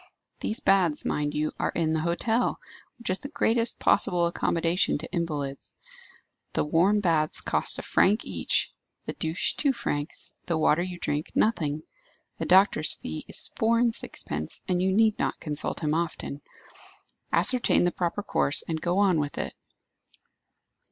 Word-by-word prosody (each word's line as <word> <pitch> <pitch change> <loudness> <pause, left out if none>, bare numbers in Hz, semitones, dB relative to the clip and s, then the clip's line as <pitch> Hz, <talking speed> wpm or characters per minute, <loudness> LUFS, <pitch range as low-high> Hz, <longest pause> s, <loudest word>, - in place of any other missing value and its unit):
These 220 - -3
baths, 180 -6 +2
mind 145 0 -1
you, 155 +1 0
are - - 0
in 160 -2 0
the 160 - +1
hotel, 220 +9 0 0.4
which 235 -5 -3
is 185 - 0
the - - -6
greatest 230 -5 +1
possible 180 -3 +2
accommodation 170 0 +1
to 160 - -8
invalids; 145 -5 -4 0.8
the - - +1
warm 185 +7 +3
baths 160 -5 +1
cost - - 0
a - - -5
franc 210 +4 +2
each, - - 0 0.3
the - - -4
douche 160 +2 -1
two 285 - +1
francs, 145 - -4
the 170 - +1
water 155 +1 +3
you 180 0 -4
drink, 150 -1 -3
nothing. 155 -9 +1 0.6
The - - -2
doctor's 185 -4 +4
fee 80 0 -6
is - - -1
four 230 +1 +3
and 235 -1 +2
sixpence, 75 - -3
and 180 -1 +1
you 190 +1 +2
need 215 +2 +3
not - - -1
consult 150 +1 -4
him 150 0 +1
often. 160 -3 -3 0.9
Ascertain 250 -7 +3
the 175 - +2
proper 175 +4 -2
course, 145 - +3
and 160 -1 -3
go 175 +1 0
on 195 -5 +3
with 145 -1 -3
it." - - -3
170 Hz, 160 wpm, -27 LUFS, 155-200 Hz, 0.9 s, doctor's